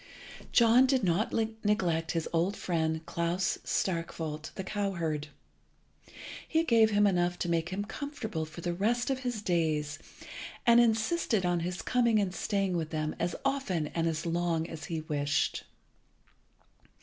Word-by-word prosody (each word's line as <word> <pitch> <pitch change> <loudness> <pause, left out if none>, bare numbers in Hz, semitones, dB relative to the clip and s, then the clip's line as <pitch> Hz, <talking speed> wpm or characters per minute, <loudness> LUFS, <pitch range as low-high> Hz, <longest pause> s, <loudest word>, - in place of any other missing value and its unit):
John 235 +2 +6
did 260 -3 +2
not 185 +4 +1
neglect 210 -7 0
his 165 -2 -1
old 175 +5 +1
friend 160 -2 -1
Klas 170 +3 -1
Starkwolt, 165 -3 -2
the 190 - -4
cowherd. 170 -7 -2 1.2
He 320 0 +2
gave 230 -7 +5
him 205 -1 +3
enough 175 -2 +2
to - - -2
make 170 0 0
him 195 +2 -3
comfortable 220 - -4
for 155 +2 -9
the 175 0 -1
rest 235 +8 +1
of 265 - -1
his 245 -4 -3
days, 155 -5 0 0.7
and 235 -1 +7
insisted 225 - +2
on 175 -1 +2
his 175 +1 -3
coming 235 -3 +3
and 195 -3 +1
staying 195 -1 0
with 160 -2 -3
him 155 -1 -2
as 175 +1 -1
often 205 - 0
and 165 -1 -1
as 165 0 -2
long 170 -1 0
as 160 -2 -7
he 165 -2 -3
wished. 145 -2 -1
180 Hz, 150 wpm, -30 LUFS, 165-220 Hz, 1.2 s, and